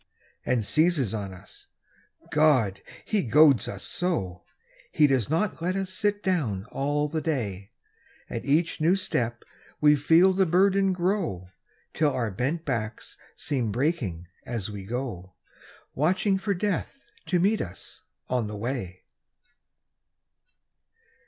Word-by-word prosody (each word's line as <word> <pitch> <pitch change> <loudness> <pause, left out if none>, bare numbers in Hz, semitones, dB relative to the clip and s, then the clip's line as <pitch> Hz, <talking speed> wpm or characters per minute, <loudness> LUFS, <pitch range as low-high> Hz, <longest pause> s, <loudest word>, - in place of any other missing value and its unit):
And 120 -4 0
seizes 150 - +2
on 100 -3 -4
us. 95 - -12 0.6
God! 130 -11 +3 0.2
he 215 -2 +1
goads 135 -1 +5
us 120 - -6
so! 125 - -2 0.5
He 150 - +4
does 130 -6 +2
not 165 +4 0
let 180 +2 -1
us 190 -1 -3
sit 205 +2 -1
down 125 - 0
all 145 +2 0
the 155 +1 -3
day. 105 - -3 0.6
At - - -5
each 155 +3 +1
new 170 +4 +4
step 120 - -2 0.4
we 150 0 +6
feel 165 +6 +5
the 190 0 +2
burden 195 +3 +3
grow, 175 - -1 0.4
Till 150 -2 +2
our 115 -4 -1
bent 135 - -2
backs 115 -5 -3 0.2
seem 125 -7 -2
breaking 120 - -1 0.2
as 110 -4 -4
we 100 -2 -7
go, 105 -6 -5 0.6
Watching 185 +6 +1
for 200 0 -1
Death 205 +8 -3 0.2
to 180 - +2
meet 205 +5 +2
us 90 - -8 0.3
on 125 -4 0
the 105 0 -6
way. 105 -6 -4
145 Hz, 130 wpm, -26 LUFS, 110-180 Hz, 0.6 s, we